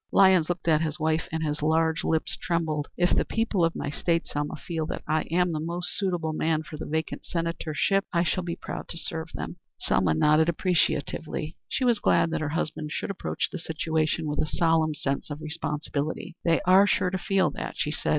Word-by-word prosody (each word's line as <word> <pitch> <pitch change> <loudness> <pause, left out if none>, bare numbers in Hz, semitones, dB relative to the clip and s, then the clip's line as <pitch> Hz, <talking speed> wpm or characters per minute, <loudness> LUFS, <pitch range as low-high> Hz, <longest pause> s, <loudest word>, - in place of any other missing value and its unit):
Lyons 185 -4 +5
looked 175 -1 -3
at 155 -1 +4
his 155 -2 -1
wife, 160 +1 0
and 160 0 -2
his 150 -1 -1
large 160 +1 +2
lips 160 -1 +1
trembled. 160 -4 -1
"If 175 0 +3
the - - +3
people 225 -5 0
of 165 0 +2
my 145 - -3
State, 165 +2 0
Selma, 145 0 -2
feel 160 -3 -3
that - - -5
I 155 0 +1
am 180 +2 +2
the 155 - -2
most 175 +3 -2
suitable 175 -5 -1
man 160 0 0
for 160 -1 -9
the - - -6
vacant 160 0 -2
senatorship, 165 +3 0
I 170 -1 +2
shall 180 +2 0
be 170 -1 -3
proud - - -6
to 170 - -5
serve 160 -1 -3
them." - - -5 0.2
Selma 85 -4 +2
nodded 155 - +4
appreciatively. 160 -3 0
She 260 - 0
was 235 -3 +3
glad 165 - +3
that - - -1
her 155 - -1
husband 155 -1 -2
should 200 - -2
approach 195 - -2
the 185 - -5
situation 160 0 -1
with 150 0 -2
a - - 0
solemn 160 -1 +2
sense 140 0 -2
of 145 0 -5
responsibility. 155 +1 -3
"They 165 -1 +3
are 190 +1 +6
sure 180 -2 +2
to 190 - 0
feel 190 -5 +2
that," - - -5
she 150 - 0
said. 155 - -2
160 Hz, 210 wpm, -27 LUFS, 155-175 Hz, 0.2 s, are